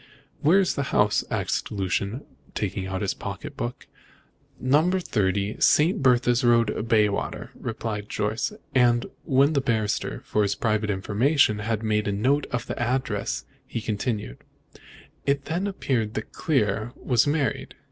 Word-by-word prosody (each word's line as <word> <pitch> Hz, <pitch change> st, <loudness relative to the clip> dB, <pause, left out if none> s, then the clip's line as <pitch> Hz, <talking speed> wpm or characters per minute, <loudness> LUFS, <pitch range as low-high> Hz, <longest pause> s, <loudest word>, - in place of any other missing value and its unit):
"Where 160 Hz, +6 st, +5 dB
is 190 Hz, -, +2 dB
the -, -, -2 dB, 0.2 s
house?" 105 Hz, 0 st, +3 dB
asked -, -, -2 dB
Lucian, 100 Hz, +5 st, -2 dB, 0.3 s
taking 95 Hz, -2 st, -2 dB
out 95 Hz, +2 st, -3 dB
his 100 Hz, -, 0 dB
pocketbook. 110 Hz, +4 st, -6 dB, 0.7 s
"Number 155 Hz, +8 st, +3 dB
30, 100 Hz, -, 0 dB
St. 165 Hz, +5 st, +4 dB
Bertha's 125 Hz, -1 st, +3 dB
Road, 115 Hz, -2 st, +2 dB
Bayswater," 105 Hz, -3 st, +1 dB
replied 110 Hz, -2 st, -5 dB
Jorce; -, -, -1 dB, 0.2 s
and 120 Hz, -2 st, +4 dB, 0.2 s
when 140 Hz, +3 st, +4 dB
the 140 Hz, -, +2 dB
barrister, 110 Hz, -5 st, -1 dB
for 105 Hz, -, +1 dB
his 100 Hz, -1 st, +1 dB
private 110 Hz, -2 st, 0 dB
information, 105 Hz, +4 st, +2 dB
had 110 Hz, +1 st, -2 dB
made 105 Hz, -1 st, +1 dB
a -, -, +1 dB
note 130 Hz, +9 st, +1 dB
of 125 Hz, -2 st, -2 dB
the -, -, -5 dB
address, 130 Hz, +2 st, -1 dB, 0.2 s
he -, -, -3 dB
continued: 105 Hz, -, -3 dB, 0.9 s
"It 140 Hz, 0 st, +1 dB
then 175 Hz, +5 st, -1 dB
appeared 125 Hz, -, -1 dB
that -, -, -4 dB
Clear 110 Hz, -5 st, 0 dB
was 125 Hz, 0 st, +2 dB
married. 145 Hz, -1 st, -1 dB
115 Hz, 140 wpm, -25 LUFS, 105-135 Hz, 0.9 s, Where